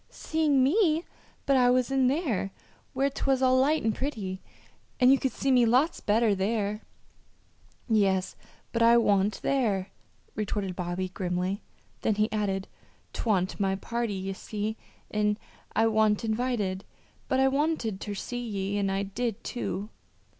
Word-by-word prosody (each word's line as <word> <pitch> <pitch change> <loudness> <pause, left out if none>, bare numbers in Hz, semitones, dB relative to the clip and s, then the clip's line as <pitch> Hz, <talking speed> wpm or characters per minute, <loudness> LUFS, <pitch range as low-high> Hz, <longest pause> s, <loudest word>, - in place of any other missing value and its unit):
"Seeing 300 -4 +1
me! 325 +2 +3 0.4
But 275 -1 +4
I 250 -1 +5
was 255 +1 +2
in 265 -1 +3
there, 260 - 0 0.4
where 270 +1 +2
'twas 270 -1 0
all 255 0 +4
light 300 +4 +2
and 220 0 +1
pretty, 210 -9 -4 0.6
and 250 +1 +6
you 270 - +5
could 265 - 0
see 270 - -1
me 250 -2 +5
lots 255 +8 +3
better 215 +1 +2
there!" 205 +2 -1 1.1
"Yes, 195 -5 +2 0.4
but 230 - -1
I 230 +1 +7
wa'n't 205 -2 +2
there," 210 -9 0 0.4
retorted 200 -3 -3
Bobby, 180 +1 -3
grimly; 180 +2 -2 0.4
then 220 - +1
he 215 0 +1
added: 195 -3 -1 0.5
"'Twa'n't 190 -5 0
my 195 -1 +1
party, 235 +1 -3
ye 190 +1 -3
see, 210 +2 -4 0.4
an' 210 0 +1 0.4
I 225 - +4
wa'n't 220 -1 +2
invited. 220 -4 -1 0.4
But 260 - +1
I 265 - +5
wanted 270 -7 0
ter 205 -1 -4
see 245 +4 -4
ye 200 -2 -2
an' 195 -1 0
I 195 +1 0
did, 215 +2 -3
too." 210 -3 -4
220 Hz, 150 wpm, -28 LUFS, 195-255 Hz, 1.1 s, I